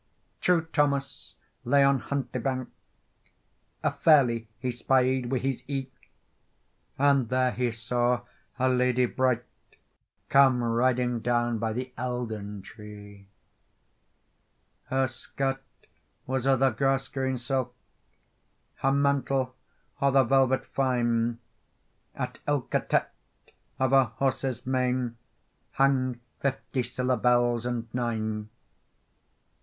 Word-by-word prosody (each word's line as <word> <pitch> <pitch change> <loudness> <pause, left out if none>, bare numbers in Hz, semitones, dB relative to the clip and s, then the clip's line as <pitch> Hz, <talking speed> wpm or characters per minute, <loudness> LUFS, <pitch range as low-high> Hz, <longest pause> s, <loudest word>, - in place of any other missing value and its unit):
TRUE 180 -2 +3
Thomas 140 -2 -1 0.3
lay 140 +3 +4
on 140 -1 +4
Huntlie 130 -3 -3
bank; 130 0 -2 1.1
A - - +2
ferlie 120 -8 +3
he 125 +1 -2
spied 130 +1 +1
wi' 130 - +1
his 135 0 -2
ee; 135 -2 -3 1.1
And 140 -4 +3
there 130 0 +2
he 125 -1 0
saw 120 +2 0 0.4
a 130 0 +2
lady 125 0 +2
bright, 125 -1 0 0.8
Come 135 -3 +5
riding 120 +1 +1
down 120 0 0
by 110 0 -1
the 125 +2 -5
Eildon 110 -5 -4
Tree. 105 -2 -12 1.6
Her 130 0 +1
skirt 135 +1 -3 0.6
was 130 0 -1
o 135 - +5
the 135 +1 +3
grass 135 +3 0
green 130 -1 -2
silk, 130 +1 -2 1.0
Her 135 - +1
mantle 135 -2 +1 0.5
o 140 - +4
the 135 0 +5
velvet 130 +1 +2
fyne, 120 -3 0 0.8
At - - -5
ilka 145 -4 +1
tett - - +1 0.7
of 130 0 +1
her 135 -1 +6
horse's 130 +1 -2
mane 125 -2 0 0.6
Hang 130 -2 +2 0.2
fifty 135 -1 -2
siller 125 +1 -1
bells 120 0 +2
and 120 -2 -3
nine. 110 -3 -2
125 Hz, 110 wpm, -27 LUFS, 120-135 Hz, 1.6 s, her